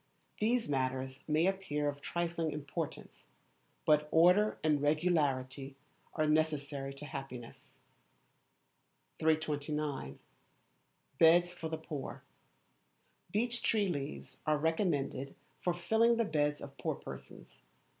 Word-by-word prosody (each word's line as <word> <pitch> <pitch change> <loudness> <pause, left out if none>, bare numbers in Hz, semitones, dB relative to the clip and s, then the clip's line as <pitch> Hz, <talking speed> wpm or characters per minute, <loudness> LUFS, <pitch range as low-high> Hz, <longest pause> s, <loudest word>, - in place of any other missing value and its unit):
These 235 +3 +2
matters 130 -1 -1
may 155 +2 +3
appear 190 -7 0
of 145 0 -3
trifling 170 0 -1
importance, 145 -1 -5 0.6
but 150 0 +4
order 180 +7 +5
and 150 -2 +3
regularity 145 -4 +1 0.4
are 155 - +2
necessary 150 -3 0
to 140 - -8
happiness. 135 -5 -8 1.4
329. 150 - 0 1.0
Beds 175 +2 +6
for 165 -2 -5
the 160 - -2
Poor. 150 -3 -6 1.1
Beech 240 +4 0
tree 210 -3 +2
leaves 145 -4 -5
are 155 0 +4
recommended 150 -4 0 0.2
for 180 - +1
filling 220 +7 +3
the 230 - +2
beds 150 -3 0
of 140 -1 -10
poor - - -1
persons. - - -11
155 Hz, 105 wpm, -33 LUFS, 140-175 Hz, 1.4 s, Beds